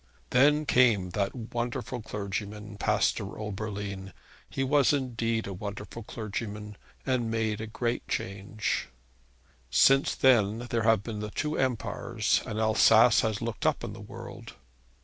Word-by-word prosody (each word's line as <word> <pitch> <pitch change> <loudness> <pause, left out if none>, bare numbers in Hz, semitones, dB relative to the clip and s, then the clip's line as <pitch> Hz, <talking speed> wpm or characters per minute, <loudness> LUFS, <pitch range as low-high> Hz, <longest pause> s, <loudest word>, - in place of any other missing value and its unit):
Then 145 +4 +4
came 115 -10 +3
that 100 +4 -1 0.2
wonderful 120 +1 -3
clergyman, 105 0 -5
Pastor - - 0
Oberlin, 100 -2 -5 0.4
he 135 - -2
was 140 +1 +4
indeed 115 -4 -1
a 100 - -5
wonderful 100 +4 -6
clergyman, 105 -1 -6 0.3
and 125 -3 0
made 110 -1 -1
a 110 - -4
great 120 +2 -2
change. 100 +2 -2 0.8
Since 135 - +4
that 120 -2 +3
there 115 - +1
have 110 -3 +3
been 110 -2 -5
the 105 0 -4
two 150 +8 -2
empires, 115 -2 0
and 110 -2 -3
Alsace 110 +1 +6
has 110 0 -1
looked 115 -1 -2
up - - +1
in - - -5
the - - -10
world. - - -10
110 Hz, 135 wpm, -28 LUFS, 105-120 Hz, 0.8 s, Alsace